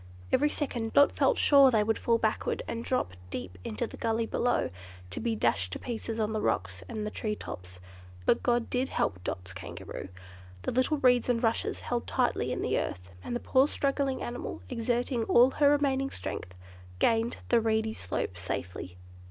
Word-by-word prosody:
Every 295 +2 +4
second 240 -7 -3
Dot 285 0 +6
felt - - +2
sure 280 -2 +7
they 220 -4 +3
would 220 +1 0
fall 230 -1 +3
backward 220 -1 -1
and 230 0 -3
drop 235 - -1 0.2
deep 90 -4 -6
into 105 - -2
the - - -10
gully 225 0 0
below, 245 - 0 0.4
to - - -3
be 230 -1 0
dashed 95 - +1
to - - -2
pieces 225 -1 -4
on 215 0 0
the 215 - -1
rocks 90 - -1
and 215 -1 -3
the 210 - -3
tree 210 -1 -2
tops. 90 - -9 0.5
But - - +3
God 240 -1 +1
did 255 +1 0
help 90 -2 -1
Dot's 90 +1 -4
Kangaroo; 95 +1 -7 0.5
the - - -1
little 255 +5 +2
reeds 250 -3 +4
and 235 -1 +1
rushes 225 0 0
held 240 -1 -2
tightly - - +1
in - - -2
the - - +1
earth, 90 +1 -5
and - - -3
the - - -1
poor 265 +3 +3
struggling 275 -2 -1
animal, 240 +1 -5
exerting 240 0 0
all 245 +4 +6
her 285 0 +4
remaining 275 -2 +2
strength, 90 - -6 0.4
gained 225 - +2
the 235 -1 +5
reedy 220 0 +1
slope 90 - -3
safely. 90 0 -5
230 Hz, 185 wpm, -29 LUFS, -, 0.5 s, sure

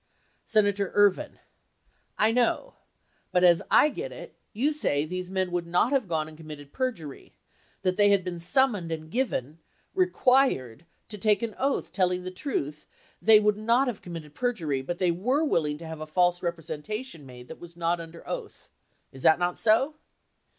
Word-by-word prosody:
Senator 205 -3 +2
Ervin. 205 -2 +3 0.8
I 220 - +4
know. 240 0 0 0.6
But 180 - +2
as 175 -2 +6
I 300 - +6
get 410 - -6
it, - - -10 0.2
you 260 +8 +1
say 150 - 0
these 180 +2 -5
men 185 -1 -1
would 175 -1 -2
not 175 +9 +2
have 270 -7 +1
gone 160 -3 -1
and 155 - -12
committed 150 -3 -11
perjury. 205 - -5 0.5
That 185 - +3
had 205 0 +6
they 200 - +5
been 180 -2 -6
summoned 190 -1 +1
and 155 0 -6
given, 165 - -2 0.3
required 255 - +2 0.2
to 210 -2 -8
take 210 +2 +2
an 225 -2 -3
oath 275 +1 -1
telling 180 -1 0
the 185 - -5
truth 155 - -4 0.3
they 220 -1 +7
would 210 -1 +2
not 230 +5 +2
have 240 -5 -4
committed 165 -4 -9
perjury 165 - -1
but 175 +6 -4
they 180 -1 +2
were 250 - 0
willing 150 - 0
to 165 - -10
have 160 -1 -7
a 155 - -6
false 175 +2 +2
representation 170 - -5
made 125 -2 -12
that - - -10
was 170 0 -13
not 170 0 0
under 165 0 -11
oath, - - -7 0.4
is 135 - -12
that 160 - +5
not 175 0 -1
so 240 +7 +3
180 Hz, 175 wpm, -27 LUFS, 160-225 Hz, 0.8 s, they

